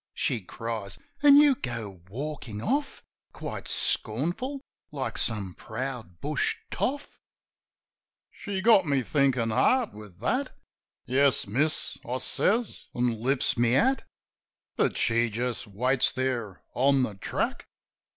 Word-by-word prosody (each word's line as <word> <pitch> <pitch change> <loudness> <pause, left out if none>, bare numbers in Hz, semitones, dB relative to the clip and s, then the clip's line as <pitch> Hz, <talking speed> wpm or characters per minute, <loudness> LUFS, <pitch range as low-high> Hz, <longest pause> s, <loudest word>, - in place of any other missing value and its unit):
She 115 - 0
cries. 100 -2 -5 0.2
"An' 285 -1 +8
you 295 -1 +7
go 115 - -5
walkin' 130 -2 -5
off, 280 - -1 0.3
Quite - - -6
scornful, 175 - -1 0.3
like 140 -3 -3
some 100 -5 -2
proud 115 -6 -6
bush 145 0 0 0.2
toff 285 +2 -2 0.6
!" - - -67
She 195 -2 -2
got 200 -5 +6
me 140 -2 +2
thinkin' 130 -4 +2
hard 250 - +3
with 105 -4 -12
that. 255 - -1 0.5
"Yes, 135 +2 +3
miss," 140 +10 0
I 125 +2 -2
says, 225 - 0
an' 120 -2 0
lifts 135 +2 +2
my 120 0 +3
hat. 255 - +3 0.7
But - - +1
she 115 0 +2
just 120 +2 -3
waits 125 +6 +1
there 120 -7 -2
on 135 +1 +3
the 110 - -2
track. 95 - -3
125 Hz, 125 wpm, -28 LUFS, 110-155 Hz, 0.7 s, An